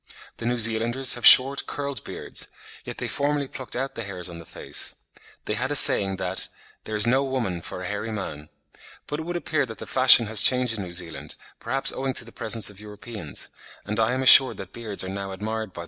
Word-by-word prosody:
The 115 - -5
New 120 0 -1
Zealanders 115 +3 +3
have 120 - +3
short, 135 +2 +6
curled 140 -1 -6
beards; - - -3 0.4
yet - - -8
they - - -4
formerly 145 0 -2
plucked 130 -1 -7
out 135 +2 -4
the 115 - -7
hairs 90 -3 -4
on 85 - -10
the 85 - -13
face. - - -2 0.5
They - - -3
had 130 +6 -3
a - - -2
saying 100 -9 +7
that 95 0 -1 0.4
"there 110 - -5
is 105 +1 +2
no 130 +3 +1
woman 120 -10 -4
for 90 - -8
a - - -7
hairy 105 +3 -5
man;" 75 -8 -7 0.6
but 150 - -5
it - - -5
would 175 - -5
appear 155 -3 -2
that 110 - -10
the - - -9
fashion 130 -2 +6
has 110 -1 +5
changed 125 -3 +2
in - - -4
New 90 -2 -8
Zealand, 85 -2 -2 0.2
perhaps 135 +4 0
owing 135 0 -4
to - - -1
the 115 - -14
presence 110 -1 -1
of 100 -1 -9
Europeans, 105 -5 -9 0.4
and 105 +2 -3
I 110 +2 +1
am 130 - -2
assured 130 0 +7
that 95 0 -10
beards 110 -5 -2
are - - -7
now 95 0 -6
admired 110 +1 -5
by - - -37
the - - -18
Maories. - - -6
115 Hz, 230 wpm, -23 LUFS, 100-130 Hz, 0.6 s, saying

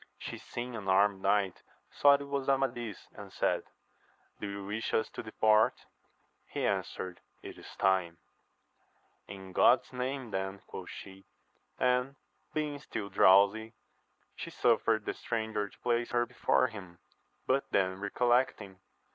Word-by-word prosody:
She - - -7
seeing 120 0 -6
an 105 -4 -6
armed 95 +1 +3
knight, 100 -1 +1 0.3
thought 140 0 +5
it 140 - -7
was 140 -1 -2
Amadis, 120 -6 -1
and - - -10
said, - - 0 0.7
Do 100 - -4
you 100 0 -6
wish 105 +3 -2
us 110 - 0
to - - -6
depart? 110 -1 +2 0.6
He - - -3
answered, 90 -2 -2 0.2
It - - -8
is - - -12
time! 95 -3 +1 1.1
In 95 -1 -10
God's 125 +6 +4
name 130 -1 -3
then, 95 0 -3
quoth 90 - -8
she; 95 0 -11 0.5
and, 125 +2 +1 0.4
being 150 -2 -2
still 110 -7 -5
drowsy, 100 +4 +5 0.6
she - - -6
suffered 115 -2 +2
the - - -2
stranger 110 -3 -3
to - - -21
place 120 -1 0
her 120 0 +1
before 125 +1 +2
him; 100 -7 -8 0.5
but 135 +1 +1
then 95 -1 +1
recollecting. 105 -2 0
110 Hz, 140 wpm, -31 LUFS, 95-125 Hz, 1.1 s, thought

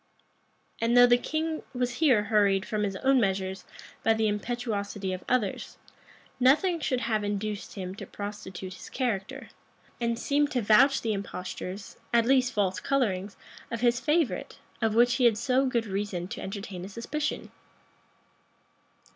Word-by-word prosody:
And 235 +1 +3
though 245 - +10
the 245 0 +5
king 315 +3 -2
was 245 0 -1
here 255 -10 +5
hurried 205 -2 +2
from 215 -3 -2
his 200 -2 -1
own 265 +6 +3
measures 190 -1 -1 0.4
by 225 - +3
the 220 0 +1
impetuosity 205 -3 -2
of 185 - -6
others, 240 -6 -1 0.6
nothing 315 +8 +4
should 255 -5 -1
have 215 -2 0
induced 205 0 -3
him 185 -2 -5
to - - -8
prostitute 190 -2 -7
his - - -11
character, 220 -7 -3 0.5
and 235 -1 0
seem 290 +4 +1
to 255 -4 -1
vouch 245 +7 +5
the 225 -2 0
impostures, 195 0 -6
at 235 -1 +4
least 255 0 +3
false 190 -4 0
colorings, 205 -8 -1 0.3
of 230 -1 -4
his 240 0 +3
favorite, 305 +1 0 0.2
of 220 -1 +1
which 240 +1 +4
he 250 - +3
had 225 -3 +5
so 255 +3 +2
good 235 -3 0
reason 195 -3 -3
to - - -6
entertain 195 -2 -6
a 190 - -7
suspicion. 290 +8 -4
225 Hz, 155 wpm, -28 LUFS, 200-250 Hz, 0.6 s, though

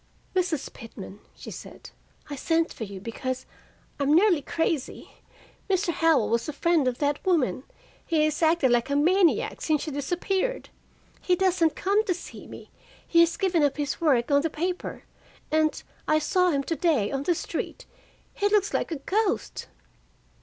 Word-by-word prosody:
"Mrs. 350 -6 -1
Pitman," 205 -3 -10 0.2
she - - -9
said, - - -10 0.4
"I 290 - -5
sent 325 +4 0
for 225 - -5
you 195 -1 -8
because 255 +5 -4 0.5
I'm 285 +2 +3
nearly 355 -3 +4
crazy. 320 -1 -2 0.6
Mr. 375 -1 +1
Howell 320 -9 +3
was 235 +4 0
a - - -4
friend 325 -2 +2
of 250 -1 0
that 285 0 -1
woman. 285 - +1 0.4
He 320 -3 +1
has 310 +2 -1
acted 320 -5 +3
like 240 +1 +2
a 280 - 0
maniac 345 +4 +2
since 305 -3 +1
she 310 - -4
disappeared. 365 - -2 0.5
He 360 - +2
doesn't 345 -4 +2
come 405 +3 +2
to 365 - 0
see - - -10
me, - - -11 0.4
he 335 - +3
has 335 0 +4
given 370 -5 +1
up 290 -1 +2
his 290 +2 -3
work 275 -5 +2
on 285 0 +5
the 325 - -1
paper, 355 +4 -4 0.5
and 310 0 +1 0.2
I 310 - +4
saw 360 +4 +2
him 280 -4 0
to 330 - -2
day 300 - +1
on 270 -1 -2
the 340 +4 +1
street - - -5 0.5
he 410 - +1
looks 410 -1 +2
like - - 0
a - - -1
ghost." 420 0 -1
315 Hz, 170 wpm, -26 LUFS, 280-360 Hz, 0.6 s, on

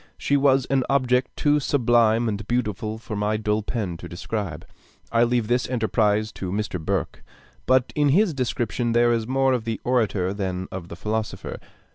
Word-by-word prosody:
She 140 - +1
was 135 -2 +3
an 135 -1 +1
object 130 -2 +2
too 150 0 +3
sublime 120 -4 +3
and 105 -1 -3
beautiful 110 -3 -2
for 110 -1 -7
my 105 +1 0
dull 105 0 0
pen 100 -6 -3
to - - -9
describe. 90 -2 -4 0.5
I 115 0 +4
leave 120 -2 +1
this 125 +1 +1
enterprise 110 -3 +1
to 95 -4 -5
Mr. 100 -4 -3
Burke. - - -2 0.4
But 130 -1 +3
in 145 -1 +3
his 185 +4 +3
description, 120 -2 -1
there 120 0 +4
is 115 -1 -1
more 135 0 +2
of 125 -3 -1
the 115 -1 -3
orator 105 -7 +1
than 95 -2 -3
of 90 -2 -6
the 85 - -8
philosopher. 110 +4 -4
115 Hz, 175 wpm, -24 LUFS, 105-125 Hz, 0.5 s, I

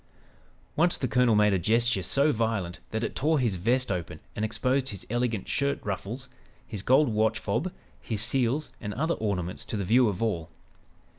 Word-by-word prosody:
Once 175 +3 +3
the 130 - -1
colonel 125 -2 +3
made 105 -1 +4
a 95 - +2
gesture 115 +2 +2
so 140 +10 +2
violent 110 -7 -1
that 110 +1 -2
it - - -3
tore 155 +3 +2
his 115 -8 0
vest 125 +6 +1
open 85 -4 -4 0.2
and 105 - -2
exposed 130 +4 0
his 100 -3 -7
elegant 120 -4 -1
shirt 140 0 0
ruffles, 105 +6 -4 0.4
his 105 -5 -6
gold 135 +6 +4
watch 110 0 +1
fob, 155 +11 -2 0.3
his 110 -3 -3
seals 130 +4 +1
and 105 0 -5
other 160 +4 +1
ornaments 90 - -3
to 110 - -4
the 100 - -2
view 120 +4 +4
of 105 +3 -3
all. 85 -8 -1
115 Hz, 180 wpm, -27 LUFS, 100-130 Hz, 0.4 s, made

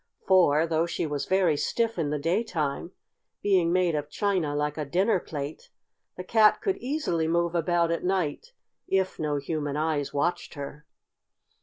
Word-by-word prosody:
For, 165 -5 +4
though 165 0 0
she 170 - -2
was 145 -2 -3
very 185 -5 +3
stiff 230 +7 -1
in 150 -3 0
the 150 - -1
daytime, 165 -2 -1 0.5
being 185 -4 +3
made 180 -1 +2
of 150 -1 -3
china 180 -5 0
like 150 0 -1
a 155 - -3
dinner 185 +8 +1
plate, 145 -2 -7 0.5
the 180 - -5
Cat 215 +2 +4
could 390 -2 -1
easily 245 - -1
move 170 +1 +1
about 170 0 +1
at 170 - -2
night 185 - -1 0.4
if 190 -1 0
no 150 -1 -1
human 145 0 -3
eyes 155 -2 -1
watched 170 +4 -1
her. 145 +1 -8
165 Hz, 160 wpm, -27 LUFS, 150-185 Hz, 0.5 s, For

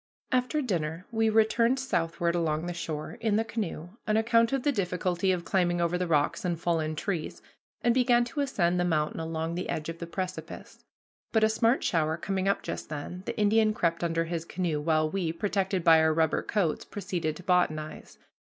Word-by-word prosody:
After 255 +4 +1
dinner 170 -5 -2
we 225 -1 +2
returned 225 +3 +3
southward 170 -8 0
along 160 -2 0
the 175 - -3
shore, 165 +5 -5
in 220 -3 +1
the 220 - +2
canoe, 200 -7 -4 0.2
on 215 0 +2
account 230 +1 +3
of 270 -2 0
the 290 - +3
difficulty 180 -3 0
of 175 -2 -2
climbing 175 -2 +1
over 170 0 +1
the 180 0 -1
rocks 150 -3 +1
and 175 -3 -1
fallen 160 -2 0
trees, 170 -1 -4 0.4
and 240 - +4
began 245 -1 +4
to 245 - -6
ascend 180 -11 +1
the - - +2
mountain 155 -3 0
along 160 0 -3
the 180 +2 -4
edge 155 +1 -3
of 165 0 -6
the 170 - -5
precipice. 185 +1 -6 0.5
But, 220 -1 +3
a 220 - +5
smart 230 +3 +2
shower 160 -1 +1
coming 190 +2 -2
up 200 - +1
just - - -5
then, 155 +4 -6
the - - -3
Indian 215 0 +3
crept 170 -2 0
under 165 -1 +1
his 165 -1 -3
canoe, 170 -3 -2
while 155 0 +2
we, 170 0 -1
protected 190 +1 -1
by 165 -1 +7
our 160 0 +3
rubber 160 -1 +2
coats, 190 -8 -1
proceeded 175 -6 -3
to 180 - -11
botanize. 155 -4 -1
175 Hz, 195 wpm, -28 LUFS, 165-215 Hz, 0.5 s, by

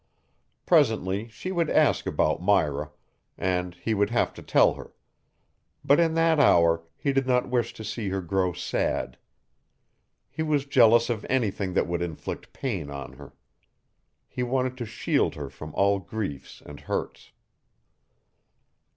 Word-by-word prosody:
Presently 110 - +2
she 115 +12 -7
would 170 -4 0
ask - - +2
about 75 +2 0
Myra, 75 -7 +1 0.5
and 90 -1 -1
he 110 +5 -2
would 100 -1 +1
have 120 +1 0
to - - -11
tell - - +4
her. - - -12 0.9
But 140 - +5
in 165 -1 +2
that 165 -1 +3
hour 85 - +4 0.2
he 140 - -1
did 135 -1 +1
not 125 0 +1
wish 120 -2 0
to 110 - -8
see 110 -1 -4
her 95 +1 -2
grow 90 +1 0
sad. 85 - -2 1.1
He - - -5
was 150 -3 0
jealous 120 -3 +5
of 110 -2 -3
anything 100 -7 0
that - - +2
would 85 0 -3
inflict 85 -3 -6
pain 95 - -4
on 70 -1 -7
her. - - -14 0.9
He - - -5
wanted 130 +1 -1
to 120 - -4
shield 105 - 0
her 70 -2 -7
from 75 +1 -9
all 100 0 +3
griefs 95 -8 -6
and 75 0 -10
hurts. - - -5
105 Hz, 150 wpm, -26 LUFS, 90-130 Hz, 1.1 s, But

